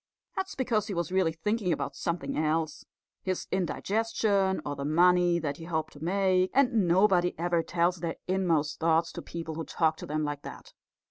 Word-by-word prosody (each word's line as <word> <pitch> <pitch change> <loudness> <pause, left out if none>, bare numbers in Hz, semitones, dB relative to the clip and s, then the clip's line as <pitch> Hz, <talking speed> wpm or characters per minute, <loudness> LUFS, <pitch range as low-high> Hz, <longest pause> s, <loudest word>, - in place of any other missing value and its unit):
That's 380 0 -3
because 230 -5 0
he 200 - -4
was 170 +1 -2
really 185 -3 +2
thinking 200 +4 -1
about 140 -3 -2
something 170 0 -3
else 155 +1 -1 0.4
his 185 -1 -2
indigestion 200 +1 0
or 145 - -3
the 140 - -5
money 175 +3 +4
that 145 -4 -3
he 165 - -9
hoped 160 -2 -2
to 145 - -11
make; 185 0 +2
and 245 -8 +3
nobody 180 0 +3
ever 170 0 +1
tells 170 +2 +1
their 165 0 -3
inmost 165 -6 +1
thoughts 165 0 +2
to - - -7
people 165 -1 -6
who 165 +1 -4
talk 160 -1 0
to - - -8
them 155 +1 -1
like 145 -1 -3
that. - - -10
175 Hz, 185 wpm, -29 LUFS, 160-190 Hz, 0.4 s, money